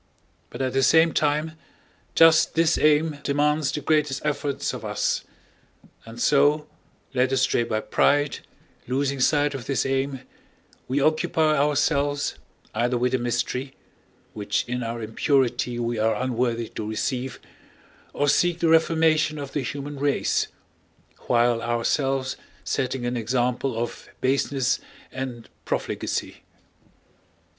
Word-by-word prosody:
But - - -4
at 130 - -1
the 135 - +2
same 160 +4 +5
time 150 +1 +1 0.6
just 165 -1 +5
this 165 +1 +3
aim 150 0 +3
demands 150 +1 +1
the 150 - -3
greatest 150 -2 0
efforts 145 -1 -1
of - - -7
us; - - -1 0.8
and 115 +1 -10
so, 145 +3 +3 0.5
led 130 0 +2
astray 130 -2 +2
by 110 -2 -1
pride, 145 +4 +2 0.5
losing 135 +2 -1
sight 145 +3 +2
of 135 -3 -7
this 135 - 0
aim, 135 0 -1 0.7
we 130 +3 0
occupy 155 +1 +2
ourselves 145 0 +1 0.3
either 120 +3 0
with 125 +1 +1
the 130 - +1
mystery 125 +3 -2 0.6
which 105 -1 -1
in 125 0 -2
our 115 0 -4
impurity 125 +1 0
we 120 -1 -2
are 110 0 +2
unworthy 120 -1 -1
to 105 -1 -5
receive, 125 +3 -3 0.7
or 145 - 0
seek 175 +4 +3
the 170 -1 +1
reformation 160 -1 +3
of 140 -2 -7
the 145 - 0
human 140 +1 -5
race 140 0 +1 0.8
while 120 -1 +3
ourselves 130 +3 0 0.3
setting 130 -1 -2
an 120 +1 -1
example 125 +1 -1
of 120 +1 -5
baseness 135 0 +1 0.3
and 130 -3 -6 0.2
profligacy. - - -3
135 Hz, 125 wpm, -24 LUFS, 120-145 Hz, 0.8 s, same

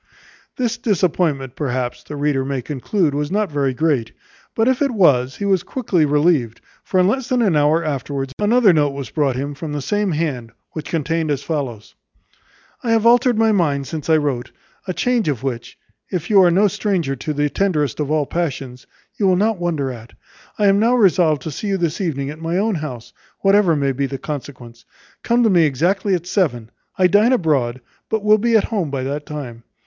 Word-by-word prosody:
This 235 -2 -1
disappointment, 165 - 0
perhaps, 130 -4 -3
the 150 - -8
reader 145 -2 0
may 135 -2 -3
conclude 150 - -1
was 145 +1 -2
not 205 -1 -1
very 140 -2 0
great; 130 -5 0 0.4
but 225 +1 +2
if 260 +1 +1
it 280 - +3
was, 135 - +3
he 200 - -4
was 190 -3 +2
quickly 185 - 0
relieved; 145 -6 +1 0.2
for 185 - 0
in 180 - +4
less 250 +4 -1
than 250 -2 +2
an 190 -7 +2
hour 150 +3 +3
afterwards 140 -2 -3
another 210 -1 +4
note 145 -3 +2
was 140 -1 -7
brought 140 -5 0
him 140 +3 -3
from 150 +1 -6
the 145 - -2
same 205 +3 -1
hand, 135 -8 -3 0.2
which 155 - -7
contained 165 0 -1
as 140 -1 -1
follows: 130 -9 -4 0.9
"I 240 - -3
have 225 0 +2
altered 240 0 +4
my 225 0 +3
mind 150 -9 +1
since 155 +3 -6
I 160 - +5
wrote; 140 -5 -2 0.4
a 185 - -2
change 245 -5 0 0.2
which, 120 -3 -5 0.3
if 175 +1 -4
you 200 -2 +7
are 180 - +5
no 195 +5 +4
stranger 180 -8 -1
to 155 - -4
the 145 0 0
tenderest 155 - 0
of 145 -2 -2
all 155 -1 +1
passions, 135 -6 -4 0.3
you 200 - +1
will 185 - +4
not 210 +1 +1
wonder 155 -6 -1
at. 115 -1 -11 0.4
I 210 - +1
am 200 0 +4
now 235 +3 +3
resolved 175 - +3
to 160 - -4
see 205 - -5
you 195 -1 0
this 170 0 -2
evening 140 -6 -2
at 155 +2 -11
my 165 +2 -1
own 215 +3 +1
house, 150 -9 -6 0.3
whatever 195 -4 +4
may 140 -2 0
be 135 +1 -2
the 135 - -5
consequence. 130 -4 -8 0.4
Come 240 +1 +2
to 225 - +4
me 175 -2 +4
exactly 180 +8 +1
at 175 -1 -5
seven; 140 - -1 0.3
I 185 - +3
dine 205 +7 +4
abroad, 135 - 0 0.3
but 220 -2 -1
will 215 0 +5
be 230 +1 +3
at 210 - +1
home 200 -9 -2
by 135 -2 -3
that 145 +3 -4
time. 130 -6 -7
155 Hz, 205 wpm, -19 LUFS, 140-200 Hz, 0.9 s, you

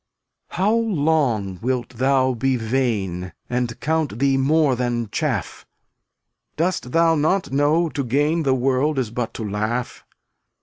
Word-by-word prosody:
276 - - -6 0.4
How 145 - -1
long 120 - +1
wilt 125 0 -1
thou 130 +1 +1
be 130 +3 0
vain 110 -7 -1
And 125 -1 -2
count 155 -7 -1
thee 135 +1 +2
more 140 +1 +3
than 120 -2 -2
chaff? - - -3 0.9
Dost 165 -6 -1
thou 165 +1 +4
not 160 +3 +1
know 150 +5 +2
to 145 -2 -3
gain 145 +7 +1
The 135 -4 +2
world 135 +3 +1
is 125 -5 -1
but 115 -1 -3
to 110 - -4
laugh? 110 +4 -3
130 Hz, 140 wpm, -22 LUFS, 120-150 Hz, 0.9 s, thou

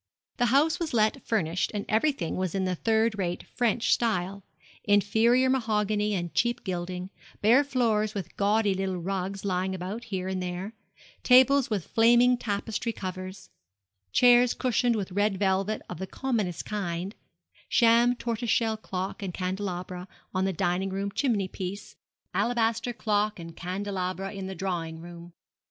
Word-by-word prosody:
The 245 - +2
house 285 +6 +3
was 325 -7 -2
let 215 -1 +2
furnished, 180 -5 0
and 205 - -2
everything 220 - 0
was 185 -1 -2
in 190 -1 0
the 185 - 0
third 220 +3 +1
rate 175 -2 -2
French 240 -1 +1
style 200 -4 -1 0.4
inferior 220 +5 +3
mahogany 210 -4 +1
and 175 -2 -3
cheap 240 +1 0
gilding, 180 0 -4 0.3
bare 235 +7 +5
floors 225 -6 0
with 185 -3 -5
gaudy 205 0 +2
little 190 -1 -2
rugs 190 +2 -3
lying 190 0 -1
about 195 +6 -5
here 190 -4 -3
and 190 -1 -2
there, 180 +4 -4 0.5
tables 260 +1 +5
with 205 -6 -1
flaming 240 +2 +5
tapestry 225 0 -2
covers, 185 -2 -7 0.6
chairs 245 - +5
cushioned 245 -1 +1
with 195 -3 -3
red 205 +1 +1
velvet 195 +2 0
of - - -7
the 190 - -4
commonest 215 -10 -2
kind, 190 -2 -3 0.6
sham 235 +1 +5
tortoiseshell 230 -1 0
clock 190 -1 -5
and 185 -3 -4
candelabra 185 -1 -4 0.3
on 185 0 +1
the 190 - +1
dining 180 +3 0
room 195 +1 -3
chimney 215 -6 0
piece, 190 +2 -6 0.4
alabaster 230 0 +1
clock 210 -2 0
and 165 -1 -9
candelabra 190 +1 -3
in 195 -1 -5
the 190 - -6
drawing 165 -3 -3
room. 170 0 -11
200 Hz, 145 wpm, -27 LUFS, 185-230 Hz, 0.6 s, bare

